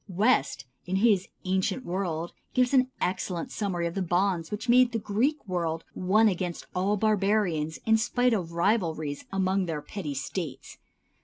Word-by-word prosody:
West, 170 - +1 0.2
in 185 - -1
his 200 -2 +3 0.2
"Ancient 190 +7 0
World," 175 -2 -3 0.2
gives 250 +1 +3
an 260 -1 +4
excellent 180 -2 -2
summary 185 -5 -2
of 170 - -2
the 195 - -2
bonds 175 -1 0
which 210 +4 -5
made 245 0 +5
the - - +1
Greek 225 +6 -1
world 165 -3 -2
one 210 +5 +3
against 180 -3 -2
all 195 +3 +1
"barbarians" 195 -7 +1
in 220 0 +5
spite 245 +2 +2
of 180 -6 -2
rivalries 165 -6 0
among 190 -1 +1
their 155 -3 -3
petty 155 -9 -5
States. 135 +3 -5
190 Hz, 155 wpm, -27 LUFS, 170-215 Hz, 0.2 s, made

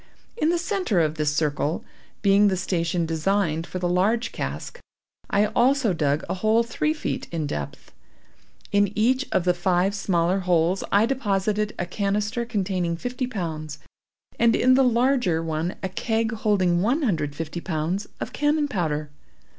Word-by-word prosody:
In 320 -9 +1
the 345 - +2
centre 360 - 0
of 155 -2 +2
this 150 -2 0
circle, 150 +1 -1 0.4
being 200 +1 +5
the 190 -2 +1
station 170 -2 -1
designed 165 0 0
for - - -5
the 180 -1 -1
large 200 +7 +1
cask, - - -5 0.5
I 205 +1 +3
also 250 -3 +3
dug 150 -2 0
a - - -1
hole 220 +5 +2
three 270 +6 -1
feet 305 - -4
in 165 -3 -2
depth. 75 - -6 0.8
In 205 -1 +3
each 255 +5 +2
of 180 - +2
the 180 0 +3
five 180 +2 +1
smaller 185 -2 +1
holes, 180 0 +1
I 205 +2 +5
deposited 210 -4 -1
a 180 - -2
canister 210 +5 -1
containing 185 -6 -1
fifty 245 +5 -3
pounds, 160 - -5 0.6
and 230 -1 +4
in 255 +1 +4
the 265 +1 +5
larger 240 -8 +2
one 160 +2 -2
a 190 - -1
keg 225 +3 -1
holding 195 -6 +1
one 255 - +1
hundred 165 - 0
and 145 - -16
fifty 165 +2 -5
pounds, 170 +4 -2
of - - -5
cannon 295 0 +1
powder. 155 - -2
195 Hz, 160 wpm, -24 LUFS, 165-230 Hz, 0.8 s, being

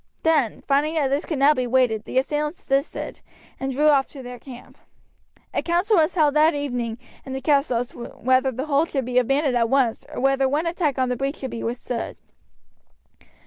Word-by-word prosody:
Then, 300 -9 +2
finding 295 +3 +1
that 290 -4 +1
this 280 +3 0
could 310 - -3
now 280 +3 +5
be 255 -3 -2
waded, 240 -4 +2
the - - -4
assailants 295 +4 -1
desisted, 275 +2 -2 0.4
and 270 0 -2
drew 295 +4 +3
off 275 -2 +3
to 270 -3 -11
their 245 0 -8
camp. 250 0 -13 0.7
A - - 0
council 355 +6 +1
was 320 +2 +2
held 300 -4 +3
that 305 +1 +4
evening 245 -5 -3 0.3
in 265 - -7
the 265 - -3
castle 280 -4 +2
as 240 +1 -2
to 235 - -9
whether 260 +3 +1
the 260 +3 -4
hold 305 +2 +1
should 270 -4 -2
be 250 0 +2
abandoned 270 +2 +1
at 230 -1 +2
once 260 -4 +1
or - - -5
whether 270 0 +2
one 300 +5 0
attack 335 -5 -1
on 255 -1 +1
the 250 - 0
breach 275 +4 -2
should 265 - -6
be 230 - -5
withstood. 240 0 -4
270 Hz, 205 wpm, -23 LUFS, 250-300 Hz, 0.7 s, now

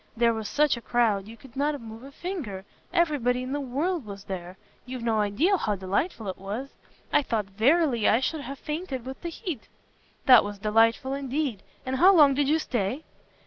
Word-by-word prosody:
There 235 0 +4
was 220 -2 -4
such 295 -4 +2
a - - -8
crowd, 215 -4 +1
you 225 +1 -11
could 260 +2 -16
not 290 +1 0
move 225 0 -10
a 275 +2 -11
finger. 275 - -5 0.3
Every 340 -4 +2
body 250 +1 +1
in 255 - -5
the 290 - -1
world 295 +6 -1
was 200 -2 -9
there. 185 -1 -7 0.3
You've 250 -1 -7
no 225 -2 +1
idea 215 - +2
how 210 - -1
delightful 200 - -2
it 190 - -5
was. 210 +8 -5 0.4
I - - +5
thought 225 -6 -1
verily 235 - +2
I 225 - +4
should 300 +4 -2
have 275 +1 -7
fainted 300 -4 -5
with 265 +1 -7
the 340 - -4
heat." 335 - -6 0.6
"That 255 -4 +8
was 205 0 -5
delightful 225 +5 +2
indeed! 275 -5 -2 0.2
And 260 0 -1
how 375 +7 +7
long 290 -4 +7
did 280 0 +1
you 310 - +4
stay?" 250 -1 -2
255 Hz, 200 wpm, -27 LUFS, 215-290 Hz, 0.6 s, That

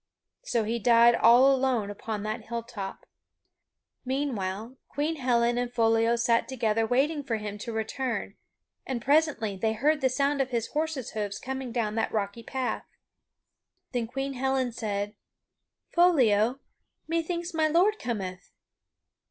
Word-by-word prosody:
So 240 - 0
he 230 +2 -1
died 235 +1 +6
all 250 +4 +6
alone 255 -6 0
upon 210 0 -5
that 215 +1 -4
hilltop. 230 -4 -6 1.0
Meanwhile, 245 -4 -3
Queen 305 +3 -1
Helen 240 -2 +2
and 245 -1 -2
Foliot 230 0 +3
sat 230 0 +2
together 225 -3 0
waiting 285 +5 +1
for 245 -4 -1
him 210 -1 -5
to 230 - -5
return 230 +3 -3 0.5
and 260 -3 -3
presently 280 -5 +2
they 220 +3 0
heard 295 +7 +1
the 260 - +3
sound 280 +2 +1
of 260 - -1
his 235 -3 -2
horse's 300 -5 -2
hoofs 205 -2 -3
coming 265 -1 -5
down 225 -3 -1
that 225 0 -1
rocky 205 +1 -2
path. 260 +2 -3 1.0
Then 240 -3 -1
Queen 270 +3 -3
Helen 265 -1 0
said: 205 -3 -3 0.8
"Foliot, 255 - +4 0.5
methinks 340 +2 -2
my 315 -1 +2
lord 370 +7 +3
cometh." 190 -6 -4
240 Hz, 135 wpm, -28 LUFS, 220-270 Hz, 1.0 s, died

